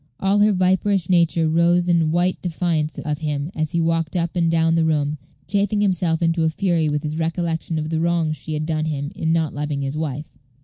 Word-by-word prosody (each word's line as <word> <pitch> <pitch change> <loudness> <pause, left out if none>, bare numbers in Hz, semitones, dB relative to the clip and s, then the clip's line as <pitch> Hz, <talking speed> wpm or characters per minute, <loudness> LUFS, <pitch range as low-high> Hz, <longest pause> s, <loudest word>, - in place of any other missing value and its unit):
All 195 +2 +2
her 210 +1 +5
viperish 190 -1 +1
nature 170 -2 +3
rose 170 +2 +2
in 170 -3 +2
white 175 +3 0
defiance 165 -3 -1
of 150 -2 -3
him, 150 0 -3
as 155 -1 -1
he 170 - -1
walked 165 0 0
up 170 -1 -1
and 170 -2 +2
down 165 0 +2
the 165 0 +2
room, 150 -2 0 0.3
chafing 205 +3 0
himself 175 -4 +1
into 165 0 +1
a 160 - +3
fury 165 -2 0
with 150 0 -2
his 155 +1 -3
recollection 165 0 -2
of 155 +1 -3
the 160 - 0
wrong 170 -1 +1
she 155 +1 -5
had 155 0 -2
done 155 -1 -1
him 145 -2 -3
in 160 - -1
not 160 -2 0
loving 145 -1 -3
his 135 +1 -3
wife. 150 -3 -5
165 Hz, 215 wpm, -21 LUFS, 155-175 Hz, 0.3 s, her